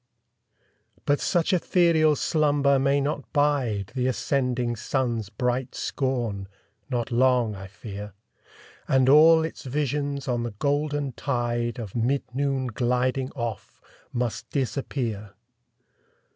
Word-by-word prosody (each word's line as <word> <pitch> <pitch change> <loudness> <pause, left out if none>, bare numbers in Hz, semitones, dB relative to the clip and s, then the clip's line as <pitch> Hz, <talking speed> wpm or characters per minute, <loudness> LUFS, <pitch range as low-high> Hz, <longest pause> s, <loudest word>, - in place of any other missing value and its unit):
But 145 0 +2
such 175 +2 +1
ethereal 170 -4 +3
slumber 145 -3 +2
may 140 +1 +2
not 145 0 -3
bide 130 - +1
The 130 -1 0
ascending 125 -2 0
sun's 115 -3 -1
bright 125 +2 -2
scorn 120 -8 -2 0.4
not 120 -1 -2
long, 125 -2 +3
I 95 0 -8
fear; 100 +1 -8 0.7
And 130 -1 +3
all 160 +3 +7
its 160 - -7
visions 140 0 -2
on 120 -2 0
the 120 -3 -4
golden 145 +1 0
tide 120 -2 -2
Of 110 -6 -6
mid 125 +4 +1
noon 135 -1 0
gliding 125 +2 0
off, 120 -6 -5 0.3
must 120 -2 -3
disappear. 120 -6 -3
130 Hz, 115 wpm, -25 LUFS, 120-145 Hz, 0.7 s, all